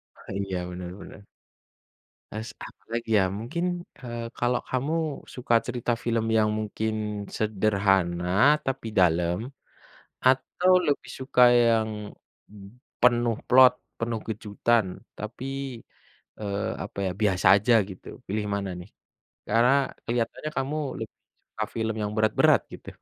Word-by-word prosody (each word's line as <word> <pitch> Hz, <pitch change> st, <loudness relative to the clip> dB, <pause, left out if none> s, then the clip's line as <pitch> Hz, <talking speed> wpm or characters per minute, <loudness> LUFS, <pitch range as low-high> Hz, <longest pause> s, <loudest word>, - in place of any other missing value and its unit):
Ah, -, -, -12 dB
iya, 95 Hz, -1 st, -2 dB
bener 90 Hz, 0 st, -6 dB
bener. 100 Hz, -, -11 dB, 1.1 s
S 110 Hz, +2 st, -5 dB
apa -, -, -12 dB
lagi, 115 Hz, 0 st, -3 dB
ya, -, -, +4 dB
mungkin, 175 Hz, +10 st, -3 dB, 0.2 s
eee, 120 Hz, -3 st, -6 dB
kalau 120 Hz, 0 st, +1 dB
kamu 135 Hz, +5 st, -1 dB, 0.4 s
suka 125 Hz, -1 st, -1 dB
cerita 120 Hz, -1 st, -2 dB
film 115 Hz, -1 st, 0 dB
yang 110 Hz, -1 st, +4 dB
mungkin 110 Hz, +1 st, -2 dB, 0.4 s
sederhana 95 Hz, -4 st, +1 dB, 0.4 s
tapi 135 Hz, -3 st, -3 dB
dalam, 85 Hz, 0 st, +3 dB, 0.9 s
atau 135 Hz, +8 st, +3 dB
lebih 145 Hz, -1 st, -1 dB
suka 130 Hz, -1 st, -1 dB, 0.2 s
yang 115 Hz, -1 st, +2 dB, 1.1 s
penuh 120 Hz, -2 st, +3 dB
plot, 130 Hz, 0 st, +8 dB, 0.3 s
penuh 115 Hz, -1 st, -2 dB
kejutan, 110 Hz, +1 st, 0 dB, 0.3 s
tapi, 110 Hz, +4 st, -6 dB, 1.0 s
eee, 100 Hz, -1 st, -2 dB
apa -, -, -11 dB
ya, -, -, 0 dB
biasa 95 Hz, -3 st, +2 dB
aja, 105 Hz, +5 st, +2 dB, 0.2 s
gitu, 95 Hz, -, -12 dB, 0.2 s
pilih 105 Hz, +2 st, -2 dB
mana, 100 Hz, -1 st, -2 dB
nih? 90 Hz, -, -11 dB, 0.6 s
Karena 115 Hz, +4 st, +4 dB, 0.3 s
kelihatannya 120 Hz, +5 st, -2 dB
kamu 135 Hz, +3 st, -1 dB, 0.2 s
lebih -, -, -7 dB, 0.3 s
suka -, -, -4 dB
film 110 Hz, 0 st, -1 dB
yang 105 Hz, 0 st, -2 dB
berat-berat, 110 Hz, 0 st, +4 dB
gitu. -, -, -9 dB
110 Hz, 125 wpm, -26 LUFS, 100-120 Hz, 1.1 s, plot